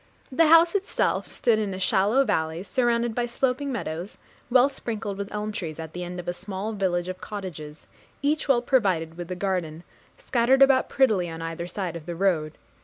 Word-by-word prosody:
The 315 Hz, +5 st, +4 dB
house 330 Hz, +2 st, +6 dB
itself 400 Hz, 0 st, 0 dB
stood 230 Hz, -3 st, +2 dB
in 200 Hz, -3 st, -2 dB
a -, -, -6 dB
shallow 205 Hz, +8 st, +3 dB
valley, 160 Hz, -5 st, -1 dB
surrounded 235 Hz, 0 st, +1 dB
by 240 Hz, +1 st, -1 dB
sloping 265 Hz, +3 st, -1 dB
meadows, 180 Hz, -5 st, -5 dB, 0.3 s
well 255 Hz, +1 st, +6 dB
sprinkled 220 Hz, -7 st, -5 dB
with 200 Hz, 0 st, -6 dB
elm 210 Hz, 0 st, -3 dB
trees, 165 Hz, -6 st, -5 dB
at 160 Hz, -1 st, -7 dB
the 180 Hz, -, -5 dB
end 180 Hz, 0 st, -6 dB
of 175 Hz, -, -8 dB
a 175 Hz, -, -1 dB
small 195 Hz, +4 st, -5 dB
village 180 Hz, -3 st, 0 dB
of 185 Hz, 0 st, -6 dB
cottages, 165 Hz, -7 st, -7 dB, 0.4 s
each 300 Hz, +2 st, +1 dB
well 250 Hz, -4 st, +3 dB
provided 185 Hz, -, +1 dB
with 175 Hz, 0 st, -7 dB
a 180 Hz, -, -3 dB
garden, 175 Hz, -4 st, -2 dB, 0.3 s
scattered 255 Hz, +3 st, +3 dB
about 270 Hz, -1 st, +4 dB
prettily 215 Hz, -10 st, +2 dB
on 165 Hz, 0 st, -6 dB
either 165 Hz, +1 st, -4 dB
side 180 Hz, -2 st, -4 dB
of 165 Hz, -1 st, -8 dB
the 175 Hz, -, -4 dB
road. 165 Hz, -5 st, 0 dB
195 Hz, 190 wpm, -25 LUFS, 175-240 Hz, 0.4 s, house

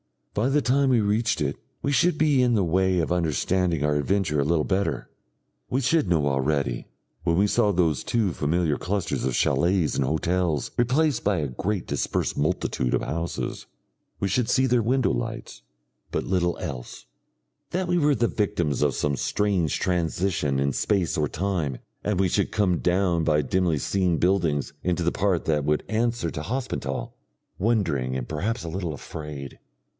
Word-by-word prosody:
By 115 Hz, +6 st, +1 dB
the 145 Hz, +2 st, +3 dB
time 135 Hz, +2 st, +2 dB
we 120 Hz, -3 st, +4 dB
reached 105 Hz, -2 st, +1 dB
it, 70 Hz, -1 st, -1 dB, 0.3 s
we 140 Hz, -, +1 dB
should 170 Hz, +3 st, +3 dB
be 150 Hz, -4 st, +3 dB
in 120 Hz, -2 st, +3 dB
the 100 Hz, -, +2 dB
way 95 Hz, +1 st, +2 dB
of 80 Hz, -, -1 dB
understanding 85 Hz, 0 st, +1 dB
our 75 Hz, 0 st, +2 dB
adventure 80 Hz, -1 st, 0 dB
a 70 Hz, -, +2 dB
little 80 Hz, 0 st, +2 dB
better. 100 Hz, +3 st, -1 dB, 0.6 s
We 130 Hz, -, 0 dB
should 145 Hz, -, +2 dB
know 80 Hz, -4 st, +2 dB
already, 70 Hz, -2 st, 0 dB, 0.4 s
when 85 Hz, 0 st, +1 dB
we 100 Hz, -, +4 dB
saw 105 Hz, 0 st, +2 dB
those 85 Hz, -7 st, +1 dB
two 110 Hz, -6 st, +1 dB
familiar 80 Hz, 0 st, 0 dB
clusters 100 Hz, -1 st, -2 dB
of 65 Hz, -2 st, 0 dB
chalets 90 Hz, -2 st, +2 dB
and -, -, +1 dB
hotels 80 Hz, 0 st, 0 dB
replaced 130 Hz, +1 st, +2 dB
by 100 Hz, -2 st, +2 dB
a 75 Hz, -3 st, -2 dB
great 95 Hz, -, -2 dB
dispersed -, -, -1 dB
multitude 65 Hz, -4 st, 0 dB
of -, -, 0 dB
houses 85 Hz, +1 st, -4 dB, 0.5 s
we 100 Hz, -, 0 dB
should 110 Hz, +5 st, +1 dB
see 130 Hz, -, +3 dB
their 125 Hz, -2 st, +3 dB
window 125 Hz, +3 st, +2 dB
lights, -, -, -4 dB, 0.5 s
but -, -, -1 dB
little 90 Hz, -2 st, 0 dB
else 65 Hz, -8 st, -7 dB, 0.6 s
that 180 Hz, 0 st, -2 dB
we 175 Hz, 0 st, +3 dB
were 145 Hz, -2 st, +3 dB
the 120 Hz, -1 st, +2 dB
victims 85 Hz, -, -1 dB
of 75 Hz, -2 st, +2 dB
some 70 Hz, -2 st, 0 dB
strange 95 Hz, -7 st, 0 dB
transition 85 Hz, -4 st, 0 dB
in 70 Hz, 0 st, +1 dB
space 90 Hz, -1 st, 0 dB
or 75 Hz, -1 st, +1 dB
time, 80 Hz, -6 st, -2 dB, 0.3 s
and 105 Hz, -3 st, 0 dB
we 95 Hz, -1 st, +3 dB
should 100 Hz, +3 st, 0 dB
come 95 Hz, -6 st, +2 dB
down 90 Hz, -2 st, +1 dB
by 75 Hz, -1 st, +3 dB
dimly 85 Hz, +2 st, +1 dB
seen 90 Hz, +3 st, +1 dB
buildings 85 Hz, -7 st, +1 dB
into 90 Hz, -1 st, 0 dB
the 85 Hz, -, +2 dB
part 95 Hz, -3 st, 0 dB
that 75 Hz, -3 st, +1 dB
would 75 Hz, 0 st, +1 dB
answer 115 Hz, -4 st, 0 dB
to 75 Hz, -, -5 dB
Hospenthal, 115 Hz, -, -3 dB, 0.5 s
wondering 85 Hz, -, +1 dB
and 65 Hz, -2 st, -3 dB
perhaps 110 Hz, +10 st, -2 dB
a 85 Hz, -, -5 dB
little 85 Hz, -2 st, -3 dB
afraid. 75 Hz, -1 st, -8 dB
90 Hz, 175 wpm, -25 LUFS, 75-105 Hz, 0.6 s, we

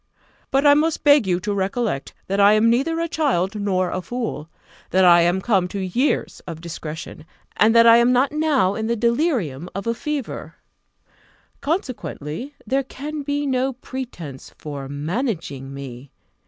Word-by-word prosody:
But 275 Hz, +2 st, +2 dB
I 285 Hz, -, +8 dB
must 310 Hz, +2 st, +1 dB
beg 285 Hz, -7 st, +5 dB
you 180 Hz, -1 st, +1 dB
to 205 Hz, +1 st, -2 dB
recollect, 200 Hz, -, -2 dB
that 195 Hz, +1 st, -1 dB
I 200 Hz, +1 st, +7 dB
am 220 Hz, +2 st, +4 dB
neither 310 Hz, +8 st, +1 dB
a 335 Hz, -, 0 dB
child 270 Hz, -, 0 dB
nor 195 Hz, -3 st, 0 dB
a 185 Hz, -, -2 dB
fool; 225 Hz, -6 st, -4 dB, 0.4 s
that 190 Hz, 0 st, +4 dB
I 175 Hz, -1 st, +7 dB
am 175 Hz, +3 st, +2 dB
come 190 Hz, -5 st, +2 dB
to 200 Hz, +2 st, -5 dB
years 195 Hz, +10 st, -1 dB
of 165 Hz, -2 st, -6 dB
discretion, 160 Hz, -2 st, -7 dB, 0.3 s
and 220 Hz, +2 st, +4 dB
that 230 Hz, 0 st, +7 dB
I 230 Hz, 0 st, +8 dB
am 235 Hz, +1 st, +4 dB
not 255 Hz, +2 st, +3 dB
now 295 Hz, -11 st, +2 dB
in 220 Hz, +1 st, -3 dB
the 235 Hz, -, +1 dB
delirium 235 Hz, -, 0 dB
of 195 Hz, -, -4 dB
a 230 Hz, -, +1 dB
fever; 290 Hz, +1 st, -5 dB, 1.1 s
consequently, 265 Hz, -, -4 dB
there 265 Hz, +5 st, +1 dB
can 295 Hz, +3 st, -6 dB
be 285 Hz, +1 st, -2 dB
no 265 Hz, 0 st, 0 dB
pretence 235 Hz, -, -8 dB
for 140 Hz, -3 st, -7 dB
managing 155 Hz, -, -3 dB
me. 135 Hz, -1 st, -8 dB
220 Hz, 165 wpm, -22 LUFS, 175-270 Hz, 1.1 s, I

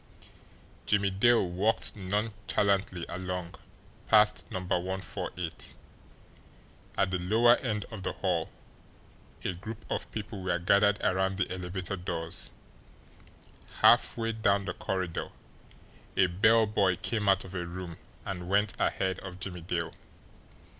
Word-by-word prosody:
Jimmie 100 Hz, -1 st, +3 dB
Dale 115 Hz, +1 st, +4 dB
walked 95 Hz, +6 st, +1 dB
nonchalantly 100 Hz, -2 st, 0 dB
along 90 Hz, -1 st, -4 dB, 0.5 s
past 105 Hz, -1 st, +5 dB
No. -, -, -3 dB
148. 90 Hz, -2 st, -3 dB, 1.2 s
At 95 Hz, -1 st, +2 dB
the 90 Hz, -, 0 dB
lower 115 Hz, +7 st, +5 dB
end 105 Hz, -5 st, -2 dB
of 110 Hz, -3 st, -6 dB
the -, -, -2 dB
hall -, -, 0 dB, 0.9 s
a 95 Hz, -, -1 dB
group 110 Hz, +5 st, -8 dB
of -, -, -2 dB
people 105 Hz, -2 st, -5 dB
were 90 Hz, -1 st, 0 dB
gathered 100 Hz, +3 st, +4 dB
around 95 Hz, +1 st, +1 dB
the 95 Hz, -, 0 dB
elevator 95 Hz, +1 st, -3 dB
doors; 85 Hz, -2 st, -4 dB, 1.3 s
halfway 115 Hz, -1 st, +5 dB
down 100 Hz, -3 st, +2 dB
the 90 Hz, -, -2 dB
corridor 90 Hz, -3 st, -3 dB, 0.9 s
a 95 Hz, -, +6 dB
bell 110 Hz, +6 st, +4 dB
boy 100 Hz, -4 st, +2 dB
came 105 Hz, +2 st, -1 dB
out 95 Hz, 0 st, +4 dB
of 95 Hz, -, -10 dB
a 90 Hz, -2 st, -2 dB
room 85 Hz, -1 st, -6 dB, 0.3 s
and 90 Hz, -2 st, -5 dB
went 100 Hz, +1 st, +3 dB
ahead 95 Hz, 0 st, 0 dB
of 95 Hz, -1 st, -8 dB
Jimmie 90 Hz, -1 st, -5 dB
Dale. 85 Hz, -1 st, -2 dB
95 Hz, 125 wpm, -30 LUFS, 90-105 Hz, 1.3 s, a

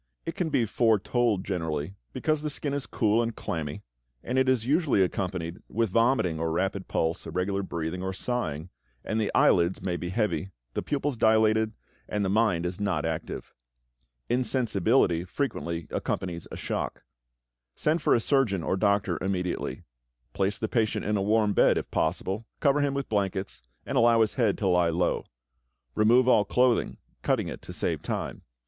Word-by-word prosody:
It 165 Hz, -, -3 dB
can 180 Hz, -5 st, -1 dB
be 125 Hz, -5 st, +2 dB
foretold 110 Hz, -1 st, +1 dB
generally, 80 Hz, -3 st, -2 dB, 0.2 s
because 155 Hz, -, 0 dB
the 155 Hz, -, -2 dB
skin 145 Hz, -1 st, -3 dB
is 140 Hz, -2 st, -3 dB
cool 110 Hz, +1 st, +2 dB
and 115 Hz, -1 st, -2 dB
clammy, 75 Hz, -3 st, -4 dB, 0.4 s
and 125 Hz, +2 st, 0 dB
it 130 Hz, 0 st, +3 dB
is 125 Hz, -4 st, +2 dB
usually 145 Hz, -, +3 dB
accompanied 90 Hz, -2 st, -3 dB
with 115 Hz, -2 st, 0 dB
vomiting 115 Hz, -7 st, +2 dB
or 80 Hz, 0 st, -1 dB
rapid 95 Hz, +3 st, -1 dB
pulse, 80 Hz, 0 st, -1 dB
irregular 95 Hz, +2 st, -1 dB
breathing, 85 Hz, -1 st, -4 dB
or 95 Hz, 0 st, -2 dB
sighing, 90 Hz, -7 st, -3 dB, 0.3 s
and 110 Hz, +1 st, 0 dB
the 105 Hz, -, -1 dB
eyelids 85 Hz, +1 st, +4 dB
may 90 Hz, -2 st, -2 dB
be 90 Hz, -, -4 dB
heavy, 105 Hz, -1 st, -1 dB, 0.2 s
the -, -, -1 dB
pupils 145 Hz, -2 st, -2 dB
dilated, 110 Hz, 0 st, +3 dB, 0.4 s
and 105 Hz, -1 st, 0 dB
the -, -, 0 dB
mind 100 Hz, -5 st, +2 dB
is 90 Hz, +2 st, -3 dB
not 85 Hz, -7 st, 0 dB
active. 80 Hz, 0 st, -4 dB, 0.7 s
Insensibility 120 Hz, -7 st, +2 dB
frequently 85 Hz, -, -3 dB
accompanies 85 Hz, -3 st, -3 dB
a -, -, -6 dB
shock. -, -, -3 dB, 0.7 s
Send 155 Hz, +2 st, +1 dB
for -, -, +4 dB
a -, -, +3 dB
surgeon 115 Hz, -, +1 dB
or 95 Hz, -, 0 dB
doctor 100 Hz, -4 st, +1 dB
immediately. 90 Hz, -2 st, -2 dB, 0.5 s
Place 100 Hz, +1 st, 0 dB
the 110 Hz, -, -2 dB
patient 110 Hz, -2 st, 0 dB
in 105 Hz, -, +1 dB
a 100 Hz, -, +1 dB
warm 105 Hz, +1 st, +2 dB
bed, -, -, +4 dB
if -, -, -4 dB
possible, 95 Hz, +6 st, -1 dB
cover 140 Hz, 0 st, +3 dB
him 140 Hz, -1 st, 0 dB
with 140 Hz, -1 st, -2 dB
blankets, 100 Hz, -2 st, -2 dB, 0.2 s
and -, -, 0 dB
allow 115 Hz, 0 st, +5 dB
his 110 Hz, -, +2 dB
head 115 Hz, -6 st, +1 dB
to 100 Hz, -, -1 dB
lie 90 Hz, -2 st, +3 dB
low. 85 Hz, +2 st, 0 dB, 0.7 s
Remove 120 Hz, +4 st, +4 dB
all 110 Hz, -5 st, +5 dB
clothing, 125 Hz, +4 st, +2 dB, 0.2 s
cutting -, -, 0 dB
it -, -, -7 dB
to -, -, -9 dB
save -, -, -2 dB
time. -, -, -4 dB
105 Hz, 170 wpm, -27 LUFS, 90-120 Hz, 0.7 s, allow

